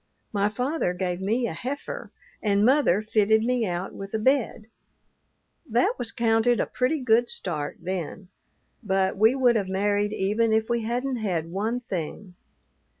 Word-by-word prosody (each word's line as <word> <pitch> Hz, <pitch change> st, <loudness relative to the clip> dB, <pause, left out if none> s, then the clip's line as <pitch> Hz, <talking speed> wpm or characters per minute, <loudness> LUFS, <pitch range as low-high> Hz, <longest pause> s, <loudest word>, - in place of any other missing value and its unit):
My 205 Hz, 0 st, +2 dB
father 250 Hz, -, -1 dB
gave 180 Hz, 0 st, -2 dB
me 225 Hz, +6 st, 0 dB
a 210 Hz, -, -3 dB
heifer, 260 Hz, -, -5 dB, 0.3 s
and 205 Hz, -1 st, +2 dB
mother 250 Hz, -7 st, +3 dB
fitted 220 Hz, 0 st, +3 dB
me 240 Hz, -2 st, +1 dB
out 175 Hz, +1 st, -3 dB
with 195 Hz, +2 st, -6 dB
a -, -, +2 dB
bed. 240 Hz, -1 st, +1 dB, 1.0 s
That 240 Hz, +2 st, +2 dB
was 235 Hz, -2 st, -2 dB
counted 230 Hz, 0 st, +2 dB
a -, -, +2 dB
pretty 255 Hz, +5 st, 0 dB
good 240 Hz, -1 st, +3 dB
start 150 Hz, -5 st, -3 dB
then, 185 Hz, +1 st, -5 dB, 0.5 s
but 190 Hz, -3 st, +1 dB
we 220 Hz, +5 st, +4 dB
would 250 Hz, -3 st, +4 dB
have 200 Hz, -4 st, 0 dB
married 205 Hz, +2 st, +1 dB
even 215 Hz, +3 st, +1 dB
if 220 Hz, +1 st, +1 dB
we 235 Hz, -1 st, +1 dB
hadn't 245 Hz, +3 st, -2 dB
had 175 Hz, -7 st, -2 dB
one 220 Hz, +6 st, -1 dB
thing. 185 Hz, -2 st, -5 dB
220 Hz, 155 wpm, -25 LUFS, 190-240 Hz, 1.0 s, we